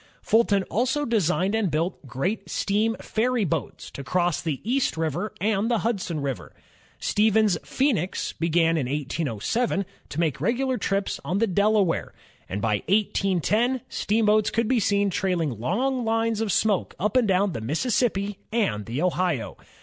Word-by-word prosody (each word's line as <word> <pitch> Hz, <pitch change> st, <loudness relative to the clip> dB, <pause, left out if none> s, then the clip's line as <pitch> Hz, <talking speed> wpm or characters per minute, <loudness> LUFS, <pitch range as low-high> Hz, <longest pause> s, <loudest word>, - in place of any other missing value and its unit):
Fulton 210 Hz, -3 st, +3 dB
also 260 Hz, +9 st, 0 dB
designed 195 Hz, -, +1 dB
and 220 Hz, -4 st, +1 dB
built 160 Hz, -1 st, -2 dB
great 160 Hz, -, -3 dB
steam 215 Hz, +3 st, 0 dB
ferry 235 Hz, 0 st, 0 dB
boats 165 Hz, -4 st, -4 dB
to 140 Hz, -, -7 dB
cross 175 Hz, +2 st, 0 dB
the 155 Hz, -5 st, -2 dB
East 250 Hz, -5 st, 0 dB
River 160 Hz, +6 st, -2 dB
and 210 Hz, +3 st, +1 dB
the 235 Hz, -, +2 dB
Hudson 180 Hz, -9 st, -1 dB
River. 135 Hz, -3 st, -5 dB, 0.4 s
Stevens's 215 Hz, -4 st, +2 dB
Phoenix 225 Hz, -, -1 dB
began 165 Hz, 0 st, +2 dB
in 135 Hz, -5 st, -1 dB
1807 150 Hz, -, -1 dB, 0.2 s
to 150 Hz, -, -5 dB
make 160 Hz, -5 st, 0 dB
regular 255 Hz, -, 0 dB
trips 195 Hz, 0 st, -1 dB
on 170 Hz, +7 st, -1 dB
the 230 Hz, -, +3 dB
Delaware, 200 Hz, -2 st, +1 dB, 0.3 s
and 100 Hz, +2 st, -4 dB
by 105 Hz, -2 st, +1 dB
18 195 Hz, -3 st, +1 dB
10 240 Hz, -, +1 dB
steamboats 215 Hz, 0 st, +2 dB
could 230 Hz, 0 st, 0 dB
be 255 Hz, 0 st, +2 dB
seen 200 Hz, -1 st, +2 dB
trailing 170 Hz, -, -1 dB
long 250 Hz, -, 0 dB
lines 225 Hz, -1 st, 0 dB
of 220 Hz, -3 st, 0 dB
smoke 205 Hz, 0 st, +1 dB
up 210 Hz, +4 st, 0 dB
and 250 Hz, -4 st, +4 dB
down 195 Hz, +1 st, +2 dB
the 130 Hz, -, -5 dB
Mississippi 200 Hz, -, 0 dB
and 115 Hz, -, 0 dB
the 125 Hz, +8 st, -2 dB
Ohio. 180 Hz, -7 st, 0 dB
200 Hz, 155 wpm, -25 LUFS, 165-225 Hz, 0.4 s, and